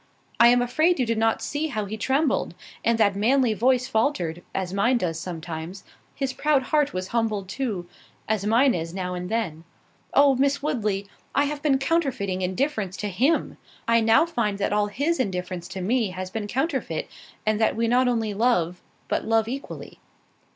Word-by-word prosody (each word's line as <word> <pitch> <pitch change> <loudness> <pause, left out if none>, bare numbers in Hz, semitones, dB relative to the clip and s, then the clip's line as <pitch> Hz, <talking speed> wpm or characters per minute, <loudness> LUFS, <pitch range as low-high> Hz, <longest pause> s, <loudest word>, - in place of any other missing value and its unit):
I 235 - +8
am 245 0 +5
afraid 310 +7 +2
you 255 - +2
did 230 -1 0
not 225 0 +1
see 295 +2 -2
how 215 -8 -3
he 205 +2 -5
trembled? 270 +7 0 0.3
and 230 0 +2
that 205 -3 +3
manly 240 +3 +3
voice 250 +4 +2
faltered, 185 - 0
as 185 -1 -3
mine 235 +6 +3
does 165 -7 -2
sometimes—his 175 - -6
proud 295 -2 +2
heart 295 +1 +1
was 185 0 -4
humbled 220 -4 -1
too, 195 -5 -3 0.4
as 215 -2 0
mine 240 +5 +4
is 165 +1 -4
now 180 -1 -3
and 180 0 -5
then. 185 -9 -2 0.5
Oh! 280 -1 +6
Miss 280 +2 +2
Woodley, 210 -8 -1 0.3
I 285 - +4
have 290 0 -3
been 290 -3 +3
counterfeiting 265 - 0
indifference 195 0 -1
to 210 - -3
him—I 230 - 0
now 225 +8 +5
find 235 -11 -1
that 200 0 -1
all 210 0 +2
his 285 +11 -1
indifference 180 -5 -3
to 190 - -6
me 225 +3 +1
has 185 0 -6
been 215 -1 -4
counterfeit, 265 - -2 0.4
and 215 0 +1
that 220 - +3
we 230 +1 +1
not 250 +2 +3
only 225 -4 0
love, 190 -6 +1 0.3
but - - -1
love 225 0 +2
equally." 270 +4 -7
225 Hz, 175 wpm, -25 LUFS, 190-265 Hz, 0.5 s, I